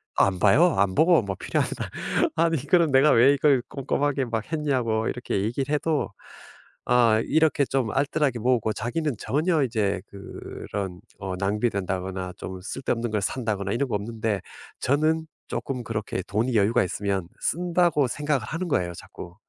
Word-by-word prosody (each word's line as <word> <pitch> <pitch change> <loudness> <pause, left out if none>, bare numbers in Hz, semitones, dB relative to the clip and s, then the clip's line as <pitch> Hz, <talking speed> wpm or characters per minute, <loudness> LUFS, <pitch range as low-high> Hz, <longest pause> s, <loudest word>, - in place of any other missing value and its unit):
안 95 -2 +3
봐요. 145 - +5
안 95 -1 +2
보고 165 - +5
막 95 -2 -5
필요하다 - - -2 0.5
아니 165 0 +2
그럼 170 -3 +4
내가 135 +3 +5
왜 125 +4 +6
이걸 140 -2 +3
꼼꼼하게 140 0 -1
막 115 +3 -4
했냐고 125 -8 0
이렇게 120 -5 -2
얘기를 130 +6 -2
해도 150 -3 0 0.8
아 120 -3 +4
이렇게 155 -2 +3
좀 130 -4 -1
알뜰하게 140 -1 +1
모으고 115 -2 +1
자기는 135 +5 -2
전혀 155 +2 +1
이제 105 -6 0
그런 100 -1 -7 0.2
어 95 -1 -4
낭비된다거나 95 -2 -2
좀 95 -1 -7
쓸데없는 120 +2 -2
걸 105 -1 0
산다거나 105 -3 -2
이런 130 +3 -1
거 105 - 0
없는데 110 -1 -2 0.4
저는 155 +4 +1 0.2
쪼끔 125 -3 -4
그렇게 110 -4 -3
돈이 115 +4 0
여유가 105 +2 +3
있으면 95 0 -2
쓴다고 170 -4 +2
생각을 145 0 -1
하는 165 +8 -3
거예요 90 - 0
자꾸. 85 +1 -10
120 Hz, 335 characters per minute, -25 LUFS, 100-145 Hz, 0.8 s, 왜